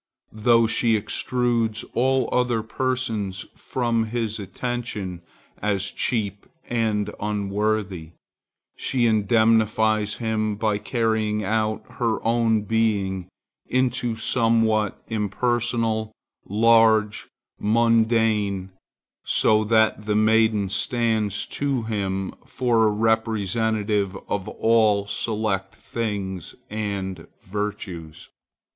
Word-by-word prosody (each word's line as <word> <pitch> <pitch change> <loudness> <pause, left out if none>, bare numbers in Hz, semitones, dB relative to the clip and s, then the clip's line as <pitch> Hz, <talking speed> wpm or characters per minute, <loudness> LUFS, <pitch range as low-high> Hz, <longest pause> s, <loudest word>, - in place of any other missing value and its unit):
Though 115 +1 +4
she 110 0 +2
extrudes 115 0 -1
all 130 +1 +2
other 125 -3 +1
persons 110 -5 -2
from 115 -3 -1
his 110 -1 -2
attention 105 -4 -4 0.4
as 100 -1 0
cheap 105 -5 -2 0.2
and 110 -3 0
unworthy, 100 -4 -2 0.6
she 125 -2 0
indemnifies 110 -1 +2
him 110 -2 -1
by 105 -1 0
carrying 110 -2 0
out 110 +1 -1 0.2
her 115 -2 +2
own 115 -2 +2
being 100 -4 0 0.4
into 125 -2 0
somewhat 110 -2 +1
impersonal, 115 +1 0 0.4
large, 110 0 +4 0.3
mundane, 110 -3 +2 0.5
so 110 0 +3
that 110 -1 +2
the 105 - +1
maiden 110 -2 +3
stands 110 0 0
to 140 -4 -2
him 95 -3 -2
for 120 -4 +1
a - - +2
representative 110 -2 0
of 100 -2 -2
all 110 -3 +2
select 105 -1 -2
things 100 -6 -4 0.2
and 100 -3 -4 0.2
virtues. 95 -5 -5
110 Hz, 90 wpm, -23 LUFS, 105-115 Hz, 0.6 s, Though